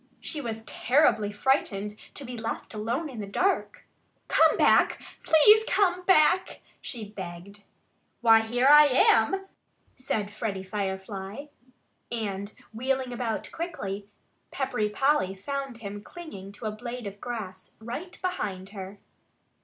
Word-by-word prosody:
She 300 Hz, -, -4 dB
was 225 Hz, -3 st, -5 dB
terribly 245 Hz, -6 st, +2 dB
frightened 210 Hz, -3 st, 0 dB, 0.2 s
to 285 Hz, -, -5 dB
be 245 Hz, 0 st, -6 dB
left 225 Hz, 0 st, -5 dB
alone 230 Hz, +9 st, -2 dB
in 255 Hz, -6 st, -8 dB
the 205 Hz, -, -5 dB
dark. 375 Hz, -, 0 dB, 0.4 s
"Come -, -, +5 dB
back -, -, +4 dB, 0.2 s
please 420 Hz, +8 st, +7 dB
come 365 Hz, -3 st, +2 dB
back!" 370 Hz, 0 st, +4 dB, 0.2 s
she 225 Hz, -5 st, -6 dB
begged. 190 Hz, 0 st, -9 dB, 0.6 s
"Why, 225 Hz, -1 st, +7 dB
here 240 Hz, +4 st, +1 dB
I 295 Hz, +1 st, +9 dB
am!" 270 Hz, +7 st, +3 dB, 0.5 s
said 220 Hz, -6 st, -2 dB
Freddie 205 Hz, -2 st, -3 dB
Firefly. 195 Hz, +4 st, -4 dB, 0.7 s
And 205 Hz, -3 st, -3 dB, 0.2 s
wheeling 260 Hz, +2 st, -1 dB
about 235 Hz, -2 st, -3 dB
quickly, 205 Hz, -, -5 dB, 0.4 s
Peppery 250 Hz, -6 st, -1 dB
Polly 270 Hz, -4 st, +1 dB
found 275 Hz, +4 st, -5 dB
him 205 Hz, -2 st, -7 dB
clinging 205 Hz, -, -10 dB
to 220 Hz, -, -10 dB
a 215 Hz, -, -1 dB
blade 240 Hz, +2 st, -7 dB
of 200 Hz, 0 st, -8 dB
grass 205 Hz, -7 st, -6 dB
right 245 Hz, +11 st, -7 dB
behind 200 Hz, -, -3 dB
her. 195 Hz, -1 st, -8 dB
225 Hz, 130 wpm, -27 LUFS, 205-275 Hz, 0.7 s, I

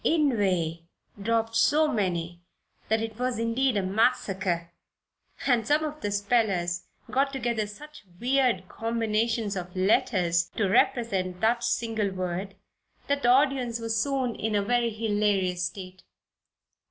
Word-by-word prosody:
"Inveigh" 200 Hz, -, +1 dB, 0.4 s
dropped 225 Hz, +1 st, 0 dB
so 305 Hz, +7 st, +4 dB
many 175 Hz, -, -2 dB, 0.5 s
that 220 Hz, +1 st, +2 dB
it 225 Hz, 0 st, -6 dB
was 250 Hz, -2 st, -1 dB
indeed 230 Hz, +1 st, +1 dB
a 200 Hz, -, 0 dB
massacre, 190 Hz, -4 st, 0 dB, 0.7 s
and 235 Hz, -4 st, +2 dB
some 300 Hz, +3 st, +3 dB
of 305 Hz, 0 st, -5 dB
the -, -, -2 dB
nervous 205 Hz, 0 st, 0 dB
spellers 195 Hz, -5 st, 0 dB, 0.3 s
got 275 Hz, +1 st, +2 dB
together 235 Hz, -5 st, -1 dB
such 300 Hz, +9 st, -12 dB, 0.2 s
weird 255 Hz, -1 st, +1 dB
combinations 225 Hz, -1 st, -1 dB
of 180 Hz, -1 st, -6 dB
letters 180 Hz, -3 st, +2 dB
to 210 Hz, -, +1 dB
represent 190 Hz, -4 st, +1 dB
that 235 Hz, +2 st, +2 dB
single 225 Hz, -3 st, 0 dB
word 185 Hz, +1 st, -4 dB, 0.5 s
that 285 Hz, 0 st, 0 dB
the 245 Hz, -, +3 dB
audience 255 Hz, -3 st, +3 dB
was 225 Hz, -1 st, -2 dB
soon 255 Hz, +1 st, 0 dB
in 220 Hz, -1 st, -2 dB
a 205 Hz, -, +2 dB
very 240 Hz, +2 st, +1 dB
hilarious 205 Hz, -5 st, 0 dB
state. 185 Hz, 0 st, -7 dB
220 Hz, 135 wpm, -27 LUFS, 190-245 Hz, 0.7 s, so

